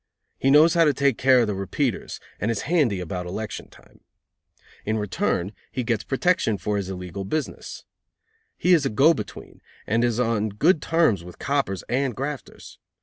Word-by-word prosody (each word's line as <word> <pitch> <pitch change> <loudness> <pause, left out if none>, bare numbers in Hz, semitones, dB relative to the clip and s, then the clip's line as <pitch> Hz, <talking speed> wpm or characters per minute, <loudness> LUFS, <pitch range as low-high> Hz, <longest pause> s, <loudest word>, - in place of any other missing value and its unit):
He 135 - +2
knows 155 +4 +6
how 170 -1 +4
to 145 -3 +2
take 140 -2 +1
care 130 -1 +5
of - - +3
the 105 - -2
repeaters, 100 +5 -2 0.2
and 105 - -1
is 115 -3 -1
handy 140 - +1
about 90 0 -5
election 105 +4 -6
time. - - -20 0.8
In 110 +1 -1
return 100 -2 -1 0.2
he 130 - -2
gets 115 -2 -1
protection 135 - +1
for 105 +1 -2
his 95 -2 -3
illegal 90 0 -6
business. 150 +10 -5 0.7
He 180 - +3
is 165 -4 +4
a 135 - 0
go 140 +10 +5
between, - - -8 0.2
and 115 +3 +1
is 120 -1 +1
on 115 -3 +1
good 150 - +2
terms 160 - +2
with 90 0 -11
coppers 135 -10 -1
and 130 -1 0
grafters. 140 +1 -7
115 Hz, 175 wpm, -24 LUFS, 100-140 Hz, 0.8 s, knows